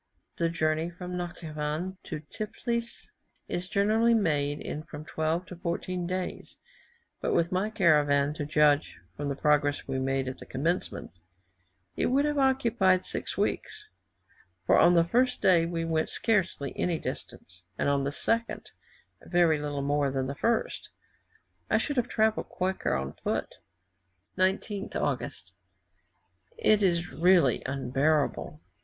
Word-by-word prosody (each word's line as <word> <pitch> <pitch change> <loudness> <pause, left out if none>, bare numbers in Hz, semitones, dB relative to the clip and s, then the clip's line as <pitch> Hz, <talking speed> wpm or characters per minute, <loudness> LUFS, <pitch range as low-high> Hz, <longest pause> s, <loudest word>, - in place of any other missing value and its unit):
The 170 -1 +1
journey 160 0 0
from 180 +1 -7
Natschivan 165 0 -4
to 150 - -5
Tiflis 235 +7 -4 0.4
is 180 +1 -3
generally 220 +3 +3
made 145 -8 +1
in 150 - -5
from 155 -1 -9
twelve 160 +3 -1
to 180 - -9
fourteen 175 +1 -3
days; 185 0 -4 0.6
but - - 0
with 170 +1 +2
my 190 +3 0
caravan, 150 -8 +3
to 150 - -4
judge 150 -1 +3 0.2
from 145 0 -3
the 140 - -2
progress 145 0 +1
we 135 -1 -2
made 135 0 0
at 130 - -5
the - - -11
commencement, 145 - -2 0.8
it - - +1
would 275 +3 +2
have 295 -1 0
occupied 230 -9 +3
six - - -3
weeks, 430 -1 -2 0.8
for - - +5
on 175 +1 +6
the 170 - +6
first 250 +8 +1
day 170 -3 +4
we 165 -1 -2
went 160 -1 0
scarcely 185 - 0
any 175 -2 0
distance, 90 - -7
and - - 0
on 140 -1 +2
the 140 - -1
second, 230 +9 -2 0.6
very 170 -4 +3
little 145 -1 -3
more 145 0 +1
than 135 -1 -1
the 135 - -3
first; 230 +10 -1 0.8
I - - +4
should 290 -3 -2
have 245 -1 +2
travelled 220 -2 +1
quicker 185 - -1
on 65 0 -3
foot. - - -3 0.8
19th 195 +2 -1
August. 95 +1 -3 1.0
It 215 -1 +4
is 175 -2 +1
really 170 -7 +4
unbearable. 140 +3 0
170 Hz, 140 wpm, -28 LUFS, 145-190 Hz, 1.0 s, on